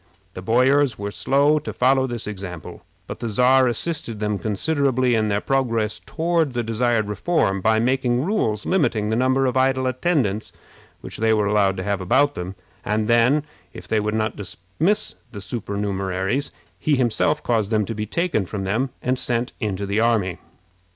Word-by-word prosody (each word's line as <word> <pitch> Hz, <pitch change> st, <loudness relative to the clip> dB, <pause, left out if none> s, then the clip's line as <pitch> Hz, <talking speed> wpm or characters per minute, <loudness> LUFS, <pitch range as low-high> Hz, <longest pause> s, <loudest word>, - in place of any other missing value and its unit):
The 95 Hz, -, -7 dB
boyars 130 Hz, +6 st, +3 dB
were 100 Hz, 0 st, -4 dB
slow 140 Hz, +6 st, +2 dB
to 150 Hz, -, -6 dB
follow 130 Hz, +1 st, +2 dB
this 120 Hz, -2 st, -5 dB
example, 95 Hz, -5 st, -7 dB, 0.2 s
but -, -, -7 dB
the 115 Hz, -, -3 dB
Czar 125 Hz, +4 st, +4 dB
assisted 120 Hz, -2 st, -2 dB
them 105 Hz, -1 st, -1 dB
considerably 130 Hz, +3 st, +1 dB
in 110 Hz, -1 st, +2 dB
their 100 Hz, -1 st, +1 dB
progress 115 Hz, -5 st, 0 dB
toward 165 Hz, -3 st, 0 dB
the 120 Hz, -1 st, -1 dB
desired 115 Hz, -1 st, 0 dB
reform 105 Hz, -, 0 dB
by 110 Hz, +3 st, +3 dB
making 125 Hz, +1 st, +1 dB
rules 115 Hz, -, 0 dB
limiting 115 Hz, -, +1 dB
the -, -, +1 dB
number 130 Hz, +2 st, +2 dB
of 125 Hz, -1 st, 0 dB
idle 130 Hz, 0 st, +2 dB
attendants 130 Hz, -, 0 dB, 0.5 s
which -, -, -7 dB
they 110 Hz, 0 st, +2 dB
were 105 Hz, -1 st, +1 dB
allowed 100 Hz, -2 st, +2 dB
to 95 Hz, -, -3 dB
have 100 Hz, -1 st, -1 dB
about 140 Hz, +10 st, +3 dB
them; 90 Hz, +2 st, -6 dB, 0.3 s
and 105 Hz, +1 st, 0 dB
then, 120 Hz, +5 st, +4 dB, 0.3 s
if 90 Hz, 0 st, -10 dB
they 110 Hz, +2 st, +1 dB
would 105 Hz, +1 st, -1 dB
not 110 Hz, 0 st, -1 dB
dismiss 100 Hz, -, -2 dB, 0.2 s
the 105 Hz, -, -6 dB
supernumeraries, 100 Hz, +2 st, -2 dB, 0.3 s
he 150 Hz, -, +2 dB
himself 135 Hz, +4 st, +1 dB
caused 110 Hz, -4 st, 0 dB
them 110 Hz, -2 st, +1 dB
to 115 Hz, -, -4 dB
be 105 Hz, 0 st, -4 dB
taken 160 Hz, -, -1 dB
from 100 Hz, 0 st, -4 dB
them 115 Hz, +8 st, 0 dB
and 125 Hz, +1 st, 0 dB
sent 120 Hz, +1 st, -1 dB
into 100 Hz, -3 st, -2 dB
the 100 Hz, +2 st, 0 dB
army. 105 Hz, -7 st, +1 dB
115 Hz, 175 wpm, -22 LUFS, 105-130 Hz, 0.5 s, Czar